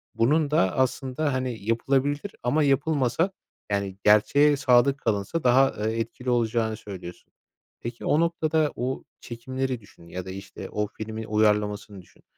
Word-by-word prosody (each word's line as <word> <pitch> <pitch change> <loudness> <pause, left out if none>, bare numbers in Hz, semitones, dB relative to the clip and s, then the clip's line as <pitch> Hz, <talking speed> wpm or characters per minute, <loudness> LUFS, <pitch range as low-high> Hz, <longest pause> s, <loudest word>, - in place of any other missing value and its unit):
bunun 145 +5 +2
da 95 -11 +2
aslında, 130 +2 0
hani, 130 -5 -3
yapılabilir 135 - 0
ama 150 +5 +2
yapılmasa, 140 +3 +1 0.4
yani, 100 -1 -1
gerçeğe 140 +8 +5
sadık 135 0 +4
kalınsa 110 +6 -1
daha, 130 +2 +4
eee, 115 +1 -2
etkili 120 +3 -4
olacağını 115 -2 +1
söylüyorsun. 90 -4 -10 0.5
Peki, 120 0 -6
o 150 - +3
noktada 160 -2 +1
o 125 +2 -3 0.2
çekimleri 130 +2 -4
düşün 90 -4 -18
ya 90 +1 -6
da, - - -7
işte, 95 0 -8
o 105 0 -1
filmin 110 +1 -6
uyarlamasını 105 -2 0
düşün. 90 - -24
120 Hz, 140 wpm, -26 LUFS, 105-140 Hz, 0.5 s, gerçeğe